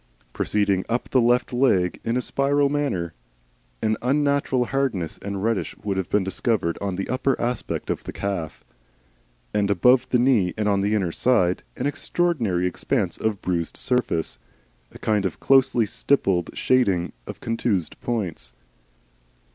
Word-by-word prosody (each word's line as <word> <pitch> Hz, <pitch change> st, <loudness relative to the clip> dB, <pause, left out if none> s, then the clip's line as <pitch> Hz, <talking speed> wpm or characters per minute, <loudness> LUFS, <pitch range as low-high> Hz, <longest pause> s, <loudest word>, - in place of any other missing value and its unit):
Proceeding 100 Hz, -3 st, +1 dB
up 120 Hz, +2 st, -1 dB
the 130 Hz, -, +3 dB
left 125 Hz, +2 st, +2 dB
leg 100 Hz, -9 st, +2 dB
in 115 Hz, +2 st, 0 dB
a -, -, +1 dB
spiral 140 Hz, +2 st, +1 dB
manner, 135 Hz, -, -1 dB, 0.7 s
an 110 Hz, 0 st, +1 dB
unnatural 140 Hz, -1 st, +1 dB
hardness 120 Hz, -11 st, -1 dB
and 100 Hz, -1 st, -4 dB
redness 115 Hz, -2 st, -1 dB
would 100 Hz, -2 st, -1 dB
have 95 Hz, -, -2 dB
been 105 Hz, -, +2 dB
discovered 95 Hz, -2 st, 0 dB
on 100 Hz, -2 st, -2 dB
the 95 Hz, -, -3 dB
upper 130 Hz, +1 st, 0 dB
aspect 120 Hz, -1 st, -2 dB
of -, -, -3 dB
the -, -, -6 dB
calf, 95 Hz, -6 st, -4 dB, 0.9 s
and 105 Hz, -1 st, +1 dB
above 125 Hz, +6 st, +4 dB
the 125 Hz, -, +3 dB
knee 120 Hz, -8 st, +3 dB
and 105 Hz, -1 st, 0 dB
on 100 Hz, -1 st, +2 dB
the 105 Hz, +2 st, +1 dB
inner 95 Hz, -5 st, 0 dB
side, 95 Hz, -5 st, +2 dB, 0.2 s
an -, -, -2 dB
extraordinary 145 Hz, -, 0 dB
expanse 90 Hz, -, -1 dB
of 110 Hz, -3 st, -2 dB
bruised 85 Hz, -3 st, -2 dB
surface, 120 Hz, -, 0 dB, 0.5 s
a -, -, -12 dB
kind 105 Hz, -2 st, 0 dB
of 95 Hz, -, -3 dB
closely 130 Hz, -4 st, +4 dB
stippled 95 Hz, -7 st, +1 dB
shading 100 Hz, -9 st, +2 dB
of -, -, -7 dB
contused 110 Hz, -7 st, -2 dB
points. 90 Hz, -, -3 dB
110 Hz, 150 wpm, -24 LUFS, 95-125 Hz, 0.9 s, above